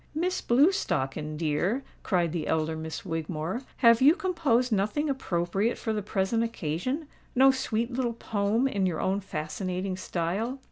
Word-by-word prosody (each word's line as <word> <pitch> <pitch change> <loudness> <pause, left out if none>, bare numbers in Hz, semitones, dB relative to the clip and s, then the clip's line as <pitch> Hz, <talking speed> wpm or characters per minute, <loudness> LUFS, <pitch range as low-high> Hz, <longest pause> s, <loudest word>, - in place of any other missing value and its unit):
"Miss 360 +4 0
Blewstocken, 155 - +1
dear," 170 - 0 0.2
cried 175 -4 +1
the 165 -2 -3
elder 160 0 0
Miss 160 +3 -6
Wigmore, 165 - -3 0.2
"have 230 0 +7
you 290 +5 +7
composed 295 -11 +1
nothing 215 +9 +1
appropriate 195 -3 -1
for 220 - -2
the 210 - -1
present 205 +3 0
occasion?—no 255 - 0
sweet 245 -2 -2
little 245 -2 0
poem 220 +2 0
in 200 -7 0
your 170 -3 -2
own 195 +1 +1
fascinating 185 +2 -3
style?" 185 +7 -2
205 Hz, 140 wpm, -28 LUFS, 170-255 Hz, 0.2 s, have